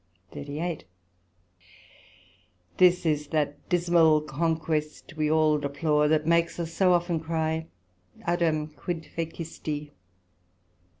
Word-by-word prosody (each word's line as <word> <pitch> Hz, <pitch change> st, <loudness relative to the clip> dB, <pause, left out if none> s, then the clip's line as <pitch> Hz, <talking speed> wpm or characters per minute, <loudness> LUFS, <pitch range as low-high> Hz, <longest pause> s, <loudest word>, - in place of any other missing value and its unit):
SECT.38 150 Hz, +3 st, -4 dB, 1.9 s
This 180 Hz, -1 st, +5 dB
is 150 Hz, -2 st, 0 dB
that 145 Hz, -1 st, -2 dB
dismal 170 Hz, -3 st, +4 dB
conquest 155 Hz, +1 st, -2 dB
we 155 Hz, -1 st, 0 dB
all 155 Hz, -1 st, +3 dB
deplore, 150 Hz, +1 st, +1 dB
that 155 Hz, 0 st, +2 dB
makes 170 Hz, +1 st, +2 dB
us 165 Hz, -1 st, -4 dB
so 185 Hz, 0 st, +4 dB
often 175 Hz, -1 st, +1 dB
cry 160 Hz, 0 st, -2 dB, 0.5 s
(O) -, -, -19 dB
Adam, 170 Hz, -3 st, +1 dB
quid 160 Hz, +1 st, -5 dB
fecisti? 160 Hz, -2 st, -5 dB
160 Hz, 105 wpm, -27 LUFS, 150-170 Hz, 1.9 s, This